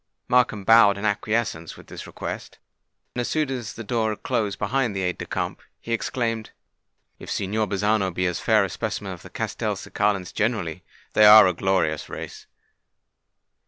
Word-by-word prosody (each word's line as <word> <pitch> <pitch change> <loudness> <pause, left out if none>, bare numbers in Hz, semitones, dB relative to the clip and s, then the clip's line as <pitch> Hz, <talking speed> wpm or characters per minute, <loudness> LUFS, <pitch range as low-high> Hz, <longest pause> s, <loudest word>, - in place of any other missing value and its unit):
Markham 120 -5 +2
bowed 110 -1 +6
an 100 - -4
acquiescence 105 -5 -1
with - - -14
this - - -9
request; - - -7 0.6
and, 125 - -2
as 120 - -2
soon 155 -3 0
as 120 -6 -4
the 115 - -8
door 110 0 0
had 105 - -5
closed 100 -3 -1
behind 120 0 0
the 95 - -1
aide 90 0 -2
de - - -5
camp, - - -3 0.2
he 115 - -4
exclaimed, 115 -1 -2 0.7
"If - - -10
Signor 105 +2 -1
Bazzano 100 0 +1
be 90 +1 -1
a 90 - +1
fair 105 +3 +2
specimen 90 - -4
of - - -11
the - - -12
Castelcicalans 100 -3 -2
generally, 95 -7 -1 0.3
they 105 - +6
are 105 +1 +10
a 90 - +2
glorious 85 -4 0
race!" - - -8
105 Hz, 165 wpm, -24 LUFS, 95-115 Hz, 0.7 s, are